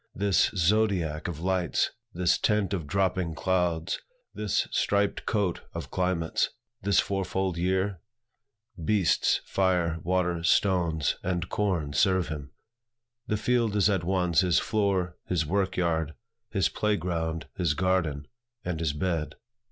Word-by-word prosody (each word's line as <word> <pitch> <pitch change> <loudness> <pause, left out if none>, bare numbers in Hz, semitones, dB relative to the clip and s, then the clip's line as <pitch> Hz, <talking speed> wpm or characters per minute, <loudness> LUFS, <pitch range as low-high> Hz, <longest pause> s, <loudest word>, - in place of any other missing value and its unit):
this 100 -1 +3
zodiac 90 -4 +1
of 85 -4 -5
lights, 90 -5 +1 0.2
this 90 -2 +1
tent 105 -2 +1
of 85 -6 -3
dropping 95 -2 0
clouds, 90 -2 0 0.3
this 105 -2 0
striped 100 0 0
coat 100 -5 0
of - - -6
climates, 90 -3 0 0.3
this 100 +1 +3
fourfold 95 -1 -1
year? 95 +2 0 0.8
Beasts, 100 -1 +2
fire, 90 -4 +1
water, 90 -1 0
stones, 85 -4 +2
and 90 -2 -2
corn 85 -9 -1
serve 95 0 +2
him. 75 -3 -6 0.8
The 105 - 0
field 115 -1 +1
is 105 0 +4
at 95 -4 0
once 90 -2 +2
his 90 -2 +2
floor, 95 -4 0
his 85 -4 0
work 95 +3 0
yard, 80 -3 0 0.3
his 95 -6 +2
play 105 -1 0
ground, 80 -2 -2
his 85 -5 0
garden, 85 -6 0 0.4
and 85 -3 -2
his 80 -3 0
bed. 80 0 -2
90 Hz, 130 wpm, -28 LUFS, 85-95 Hz, 0.8 s, is